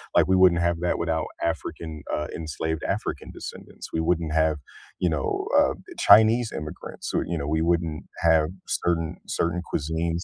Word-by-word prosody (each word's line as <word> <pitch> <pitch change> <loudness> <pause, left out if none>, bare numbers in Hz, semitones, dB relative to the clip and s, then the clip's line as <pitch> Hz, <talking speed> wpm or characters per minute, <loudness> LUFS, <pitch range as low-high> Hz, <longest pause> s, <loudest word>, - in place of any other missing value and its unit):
like - - +5
we 95 - +4
wouldn't 90 -2 +5
have 85 0 0
that 90 - +1
without 80 -2 -1
African, 80 -1 -3
uh, 75 - -1
enslaved 80 0 -3
African - - -3
descendants, - - -9
we 80 - +1
wouldn't 80 -1 0
have, 80 -1 +2 0.4
you 90 - +2
know, 75 -4 -1
uh, - - +4 0.2
Chinese 110 +3 +6
immigrants, 75 0 -6
who, - - +1
you 85 - -2
know, 70 -2 -3
we 80 +1 +1
wouldn't 85 -2 0 0.2
have 80 -1 +4 0.2
certain 80 -2 0
certain 85 +1 -1
cuisines, 80 +3 -1
80 Hz, 165 wpm, -25 LUFS, 80-85 Hz, 0.4 s, Chinese